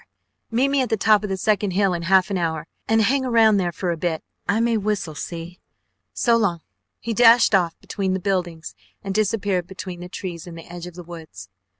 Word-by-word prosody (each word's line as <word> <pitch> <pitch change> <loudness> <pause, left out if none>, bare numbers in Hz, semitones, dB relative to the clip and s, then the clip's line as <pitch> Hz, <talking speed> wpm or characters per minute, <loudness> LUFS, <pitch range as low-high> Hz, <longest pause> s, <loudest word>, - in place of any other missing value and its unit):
Meet 250 +4 +2
me 275 -1 +2
at 255 - -1
the 220 - +1
top 210 0 +4
of 210 - -3
the 190 - -1
second 205 -1 +1
hill 195 0 +2
in 170 - -3
half 185 +3 +3
an 195 - 0
hour, 160 -2 -2 0.2
and 225 0 +3
hang 265 +5 +2
around 225 -4 +4
there 180 -3 0
for 175 +2 -2
a 170 - -3
bit. 160 -1 -2 0.3
I 210 +2 +2
may 230 0 +2
whistle, 205 -6 -1
see? 170 +3 -7 0.5
So 235 -1 +2
long." 180 -7 0 0.4
He 230 - -3
dashed 230 0 +6
off 175 -4 +2
between 190 -2 -2
the - - -2
buildings 175 - -2 0.3
and 195 - -3
disappeared 200 -4 0
between 185 -1 -7
the 180 0 -8
trees 180 -3 -6
in 170 - -9
the 165 - -10
edge 175 0 -8
of 175 - -11
the 180 - -8
woods. 160 - -10
190 Hz, 220 wpm, -22 LUFS, 175-215 Hz, 0.5 s, dashed